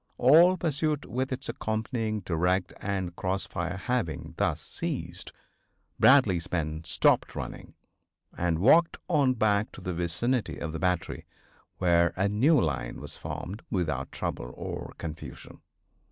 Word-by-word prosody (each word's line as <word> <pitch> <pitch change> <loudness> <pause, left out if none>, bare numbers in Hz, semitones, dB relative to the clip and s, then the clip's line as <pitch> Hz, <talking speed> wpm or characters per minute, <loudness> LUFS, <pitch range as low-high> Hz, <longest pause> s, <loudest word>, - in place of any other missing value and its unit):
All 170 +8 +6
pursuit 155 -2 -1
with 130 +3 -2
its 130 +1 -4
accompanying 110 -1 -2
direct 90 +1 0
and 95 -3 -2
cross 95 -1 -2
fire 85 +3 -4
having 110 - -2
thus - - +1
ceased, - - -5 0.7
Bradley's 100 -11 +5
men 80 -2 -2
stopped 75 - +2
running - - -7 0.6
and 85 -2 0
walked 160 - +5
on 145 -7 +3
back 110 -1 +2
to - - -10
the 90 0 -3
vicinity 90 +9 -1
of 80 - -4
the 80 - -4
battery 90 0 -1 0.5
where 85 -2 +3
a 95 +2 +1
new 125 +11 +4
line 65 -7 -2
was - - -7
formed 100 +5 -6
without 75 -8 -1
trouble - - -4
or - - -6
confusion. 80 -1 -8
95 Hz, 135 wpm, -28 LUFS, 85-125 Hz, 0.7 s, All